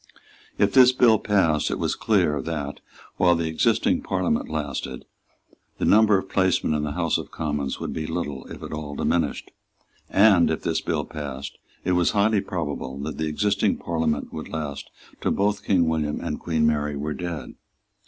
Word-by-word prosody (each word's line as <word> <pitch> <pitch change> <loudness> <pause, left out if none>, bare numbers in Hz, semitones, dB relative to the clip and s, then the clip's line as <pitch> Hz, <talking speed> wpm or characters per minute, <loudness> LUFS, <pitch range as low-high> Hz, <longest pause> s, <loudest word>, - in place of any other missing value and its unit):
If 100 -1 +2
this 130 -1 +8
bill 120 -4 +4
passed, 85 -7 +2
it - - -2
was - - 0
clear 75 -2 +1
that, 75 -2 -4 0.4
while 90 -1 +4
the 80 0 -1
existing 80 -1 +2
Parliament - - -1
lasted, 70 -4 -4 0.7
the - - -1
number 105 -1 +5
of 95 - -4
placemen 95 -5 +1
in 75 - 0
the 75 -1 -3
House 85 0 0
of - - -8
Commons 75 -3 -3
would - - -4
be 80 -1 -4
little, 75 -5 -4
if - - -9
at - - -6
all, 75 -2 -5
diminished; 80 0 -1 0.6
and, 95 -4 +5
if 80 - -2
this - - 0
bill 75 -3 -1
passed, 70 -3 -7 0.3
it 90 - +1
was 90 -1 +2
highly 105 0 +3
probable 75 -8 -4
that 75 +1 -5
the 80 - 0
existing 100 +5 +1
Parliament 80 -3 -2
would 80 - -6
last 75 -3 -5 0.3
till - - +1
both 100 +1 0
King 90 -4 +2
William 75 -2 -1
and - - -4
Queen 80 -2 0
Mary 75 -1 +1
were 75 +2 -3
dead. 85 +1 -5
80 Hz, 175 wpm, -24 LUFS, 75-95 Hz, 0.7 s, this